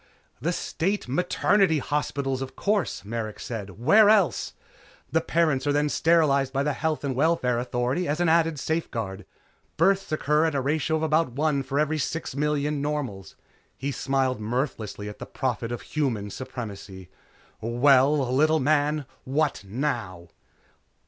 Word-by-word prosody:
"The 165 +6 0
State 190 +2 -2
maternity 180 +4 +2
hospitals, 140 -2 -2
of 135 0 -6
course," 200 - -1
Merrick 110 0 -4
said, 105 -4 -6
"Where 205 - +6
else? 210 -4 +2 0.6
The 160 +3 +2
parents 155 -5 +1
are - - +3
then 145 +1 +1
sterilized 145 -5 +3
by 135 +1 0
the 150 0 0
Health 155 +1 -2
and 135 -3 -2
Welfare 130 -4 +2
Authority 125 +7 -1
as 150 +3 -1
an 175 - +2
added 165 -1 +3
safeguard. 115 - -3 0.5
Births 195 +3 +2
occur 150 0 +2
at 160 -3 0
a - - +2
ratio 150 +3 0
of 160 - -1
about 155 -4 +1
one 145 +1 +1
for 135 +2 -2
every 155 +1 +1
six 155 0 -3
million 150 0 0
normals." 140 -10 -4 0.4
He 140 +1 -3
smiled 130 -2 0
mirthlessly 110 -3 -3
at 105 - -8
the - - -7
Prophet 120 -2 -2
of 120 - -5
Human 115 -10 -2
Supremacy. 100 -8 -8 0.5
"Well? 130 +3 +3
Little 155 +4 +3
man, 150 +1 +1 0.2
what 145 -2 0
now?" 105 - -3
140 Hz, 150 wpm, -26 LUFS, 125-155 Hz, 0.6 s, Where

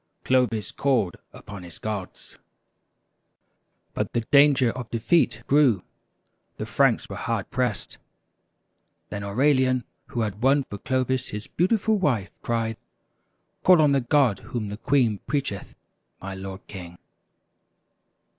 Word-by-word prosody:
Clovis 125 -5 +1
called 120 -10 0
upon 100 -2 -10
his 85 -1 -11
gods. 105 -4 -6 1.5
But - - -3
the 120 - +1
danger 140 0 +5
of 125 -1 -7
defeat 120 -1 +1
grew 135 -10 +3 0.7
the - - -4
Franks - - +2
were - - -7
hard - - -3
pressed. - - -2 1.1
Then 100 -1 -5
Aurelian, 130 +3 +2 0.2
who 120 - -3
had 105 -1 -3
won 135 +2 +4
for 100 -5 -9
Clovis 130 +1 0
his 105 +1 -6
beautiful 215 +4 +1
wife, 120 - 0
cried: 115 -1 -1 0.4
" - - -48
Call 180 -2 +7
on 150 -2 +5
the 140 -1 +3
God 125 -4 +2
whom 110 -2 -5
the 105 - -6
queen 120 -5 +2
preacheth, 135 -8 -3 0.4
my 95 0 -6
lord 95 0 -8
King!" 90 -3 -9
120 Hz, 125 wpm, -25 LUFS, 105-140 Hz, 1.5 s, Call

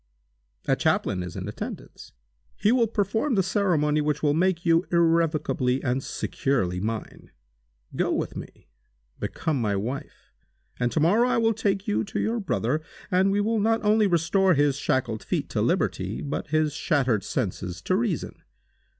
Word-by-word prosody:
A - - +4
chaplain 95 -3 0
is 90 -1 -6
in 95 0 -5
attendance. 105 - -8 0.4
He 210 +2 +2
will 240 -2 +3
perform 220 +5 0
the 190 - +3
ceremony 170 -7 +1
which 150 0 -1
will 145 -1 +3
make 175 +1 +1
you 165 0 +4
irrevocably 165 -6 +2
and 130 +1 0
securely 95 -10 -1
mine. 110 +3 -5 0.7
Go - - 0
with - - -2
me. - - -10 0.5
Become 155 -6 -2
my 105 -3 0
wife, 120 +8 -5 0.5
and 120 -1 +1
to - - 0
morrow 210 +11 +4
I - - +2
will 225 0 +3
take 200 -2 -1
you 210 - +1
to 200 - -4
your 230 +2 0
brother, 160 -6 -1 0.3
and 190 +2 +3
we 205 +1 +2
will 220 +2 +1
not 225 +2 +1
only 210 0 +4
restore 180 +1 +3
his 145 -1 +3
shackled 130 -7 -1
feet - - -2
to - - -1
liberty, - - 0
but 145 - -3
his 155 -1 +1
shattered 130 - +1
senses 90 -1 -3
to 185 - +1
reason. 205 -6 -2
165 Hz, 160 wpm, -25 LUFS, 135-200 Hz, 0.7 s, A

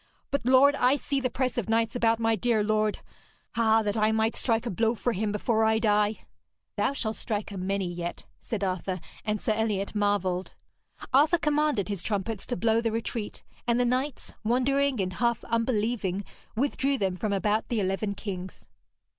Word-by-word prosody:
But, 280 -4 -1
lord, 265 +2 +6
I 260 -1 +3
see 280 -1 -1
the 255 -1 0
press 250 0 -1
of 220 - -4
knights 225 0 +1
about 230 -1 +3
my 225 0 +2
dear 220 0 +1
lord. 215 0 +1 0.5
Ah, 225 -1 +4
that 205 -1 -1
I 215 0 +3
might 220 +1 +1
strike 230 -1 0
a 235 - -2
blow 225 +5 +1
for 240 +1 -1
him 210 +1 -1
before 220 +2 +1
I 220 0 +3
die!' 210 -1 +1 0.5
'Thou - - +1
shalt 225 -5 -2
strike 210 -2 -3
a - - -6
many 195 +1 -1
yet,' 175 0 -5 0.2
said 210 -3 -3
Arthur, 185 0 -2 0.2
and 210 0 -1
Sir 215 - 0
Eliot 215 -3 -1
marvelled. 205 -3 0 0.6
Arthur 300 +6 +5
commanded 300 - +1
his 200 -4 -3
trumpets 205 +1 -2
to 245 - -2
blow 225 +3 +2
the 230 -1 0
retreat, 225 -1 -4 0.2
and 235 0 +3
the 245 - +3
knights, 255 +3 -2
wondering 260 +3 +2
and 185 -1 -1
half 235 +2 0
unbelieving, 225 -4 0 0.3
withdrew 275 +2 +1
them 190 -5 0
from 210 +3 -2
about 210 +2 0
the 235 - 0
eleven 200 +1 -1
kings. 185 -2 -6
220 Hz, 180 wpm, -27 LUFS, 205-240 Hz, 0.6 s, lord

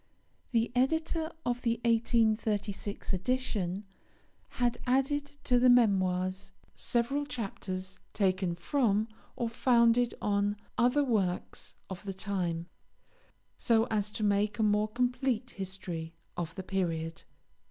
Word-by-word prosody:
The 230 -1 +1
Editor 320 +5 +1
of 245 0 0
the 230 -1 0
1836 220 -3 +1
edition 200 -2 -1 0.7
had 240 -1 +1
added 270 +3 +2 0.2
to 245 -1 +3
the 250 +1 +6
Memoirs 190 -4 +3 0.2
several 245 +5 0
chapters 190 -6 -5
taken 185 -3 +1
from 215 - +1 0.3
or 235 - -1
founded 235 0 +3
on 205 0 +1 0.2
other 250 +5 +3
works 200 -9 -1
of 190 0 -7
the 195 -2 -5
time, 180 -4 -2 0.9
so 225 -1 +3
as 210 -1 +1
to 215 - -3
make 205 0 +2
a 220 - +1
more 210 0 +3
complete 245 +1 0
history 180 -4 -6 0.2
of 165 -1 -4
the 190 - -5
period. 165 -4 -2
215 Hz, 115 wpm, -31 LUFS, 190-245 Hz, 0.9 s, the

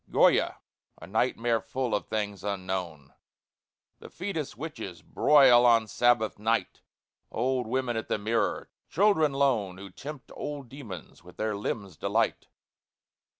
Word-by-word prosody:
GOYA, - - +4 0.4
a - - -9
nightmare 115 -1 0
full 120 0 -3
of 105 - -1
things 105 -3 -3
unknown; 95 -7 -4 0.9
The - - -11
fÅtus 175 -6 -4
witches 110 - -7
broil 135 -5 +6
on 115 -2 +5
Sabbath 120 -2 +2
night; 110 +2 -1 0.5
Old 125 0 -1
women 125 0 -1
at 110 - -3
the - - 0
mirror; 110 +3 -1 0.2
children 165 -4 +3
lone 125 -10 +1
Who 100 0 -10
tempt 140 +6 -9
old 145 -4 -6
demons 110 - -10
with 90 0 -15
their 110 -1 -1
limbs 100 -4 -4
delight. - - 0
115 Hz, 130 wpm, -28 LUFS, 100-135 Hz, 0.9 s, broil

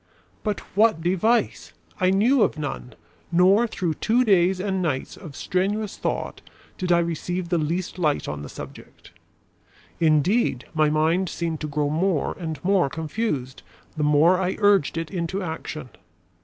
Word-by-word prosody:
But 210 -2 -2
what 215 -5 +4
device? 190 +7 +1 0.3
I 185 -1 +3
knew 225 +7 +3
of 165 - +2
none, 140 -4 -5 0.4
nor 190 +7 +4
through 180 -6 -2
two 240 +10 +1
days 190 -2 +3
and 190 -1 -1
nights 145 -7 -2
of 155 -8 -11
strenuous 200 +5 -1
thought - - -3 0.4
did 180 -1 -1
I 175 - +6
receive 170 +1 -2
the 175 -1 +1
least 170 +4 -3
light 150 -4 0
on 75 0 -4
the 70 - -8
subject. - - -11 0.9
Indeed, 155 - +2
my 155 -2 +3
mind 160 +4 +1
seemed 165 -2 -3
to 155 - -2
grow 145 -1 -1
more 170 +1 0
and 160 -3 -4
more 185 -6 +3
confused 150 - -3 0.3
the 155 - -3
more 150 +5 +4
I 185 0 -1
urged 205 -7 +3
it 165 -1 -4
into 185 +1 -3
action. 155 -4 -6
175 Hz, 155 wpm, -24 LUFS, 155-195 Hz, 0.9 s, I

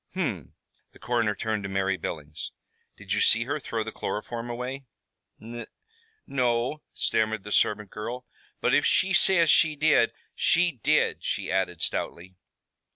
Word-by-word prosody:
"Hum." - - -3 0.4
The - - -16
coroner 115 -4 0
turned 110 +1 -2
to 100 - -5
Mary 95 0 +1
Billings. 75 -3 -6 0.5
"Did - - -4
you - - +1
see 115 +1 +5
her 145 +5 -2
throw 115 -4 -3
the 110 - -6
chloroform 115 +3 -4
away?" 125 +3 -5 0.5
"N 120 +1 -8 0.6
no," 125 +2 0
stammered 110 -2 0
the 105 - -8
servant 105 -1 +2
girl. 120 +4 -5 0.4
"But - - +2
if - - +5
she 190 +1 +3
says 170 -3 +5
she 155 +3 +4
did, 155 +1 +4 0.2
she 175 +1 +3
did," - - +2
she - - -2
added 95 -3 0
stoutly. 90 +2 -3
115 Hz, 150 wpm, -27 LUFS, 105-130 Hz, 0.6 s, see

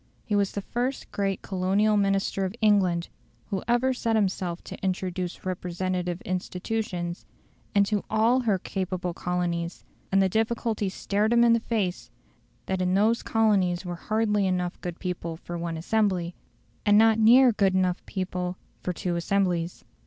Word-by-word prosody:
He 210 - 0
was 200 -1 +1
the 200 - -4
first 250 +5 -3
great 195 -1 -1
Colonial 195 +3 +1
Minister 195 -1 +1
of 190 +2 -3
England 190 -6 +3 0.4
who 195 -2 -1
ever 245 +2 +2
set 230 -3 0
himself 185 -4 -1
to - - -9
introduce 185 -1 -3
representative 180 0 -2
institutions 180 -1 -3 0.5
into 200 0 +2
ALL 225 +4 +3
her 220 -6 +1
capable 185 -1 -3
colonies, 175 -1 -2 0.3
and 195 - +4
the 190 - +4
difficulty 220 0 0
stared 205 +3 0
him 235 0 +5
in 235 -1 +6
the 230 - +3
face 185 - -2 0.6
that 190 -1 -1
in 180 0 +1
those 220 +4 +3
colonies 200 -5 +2
there 175 - -5
were - - -3
hardly 210 +1 +1
enough 180 -1 -2
good 175 -1 -5
people 170 -3 -4
for 175 +1 -7
one 170 -1 -3
assembly, 180 -1 0 0.5
and 205 0 +5
not 225 0 +5
near 240 +3 +7
enough 185 -2 +3
good - - -36
people 180 -1 -3 0.2
for 180 - -2
two 175 0 -2
assemblies. 175 -1 0
190 Hz, 155 wpm, -26 LUFS, 180-215 Hz, 0.6 s, near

